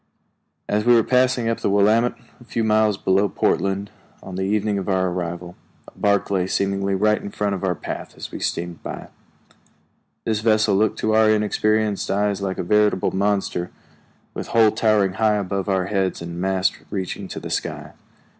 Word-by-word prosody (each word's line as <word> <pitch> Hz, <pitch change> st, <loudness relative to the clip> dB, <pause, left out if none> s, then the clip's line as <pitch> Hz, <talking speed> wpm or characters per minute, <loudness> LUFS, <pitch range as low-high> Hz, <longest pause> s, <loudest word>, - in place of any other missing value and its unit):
As 105 Hz, +1 st, 0 dB
we 120 Hz, +1 st, +5 dB
were 115 Hz, -, +5 dB
passing 125 Hz, -1 st, +2 dB
up 115 Hz, -, 0 dB
the -, -, 0 dB
Willamette, 110 Hz, +4 st, +3 dB, 0.2 s
a -, -, -15 dB
few 115 Hz, -1 st, -2 dB
miles 110 Hz, -1 st, +3 dB
below 100 Hz, +1 st, +2 dB
Portland, 100 Hz, +2 st, 0 dB, 0.3 s
on 95 Hz, -, -9 dB
the 95 Hz, -, -3 dB
evening 105 Hz, 0 st, 0 dB
of 95 Hz, -, -4 dB
our 95 Hz, -1 st, +1 dB
arrival, 90 Hz, 0 st, -5 dB, 0.3 s
a -, -, -15 dB
bark 100 Hz, -1 st, +1 dB
lay 95 Hz, -2 st, +1 dB
seemingly 100 Hz, 0 st, 0 dB
right 105 Hz, +2 st, +2 dB
in -, -, -6 dB
our 100 Hz, -3 st, 0 dB
path -, -, -7 dB
as -, -, -7 dB
we -, -, -6 dB
steamed 85 Hz, -1 st, -3 dB
by. -, -, -7 dB, 1.2 s
This 110 Hz, -2 st, 0 dB
vessel 110 Hz, -2 st, +3 dB
looked 105 Hz, +2 st, +1 dB
to 110 Hz, -, +1 dB
our 110 Hz, 0 st, +5 dB
inexperienced 105 Hz, 0 st, +1 dB
eyes 100 Hz, 0 st, 0 dB
like 95 Hz, -1 st, -2 dB
a -, -, -2 dB
veritable 105 Hz, 0 st, +2 dB
monster, 95 Hz, -3 st, 0 dB, 0.6 s
with -, -, -5 dB
hull 110 Hz, -2 st, +4 dB
towering 105 Hz, -4 st, +2 dB
high 105 Hz, +2 st, +2 dB
above 100 Hz, -1 st, -2 dB
our 95 Hz, -1 st, +1 dB
heads 95 Hz, -1 st, -1 dB
and 85 Hz, +1 st, -6 dB
masts 95 Hz, 0 st, +1 dB
reaching 95 Hz, 0 st, -4 dB
to -, -, -6 dB
the -, -, -7 dB
sky. -, -, -3 dB
100 Hz, 175 wpm, -22 LUFS, 95-110 Hz, 1.2 s, we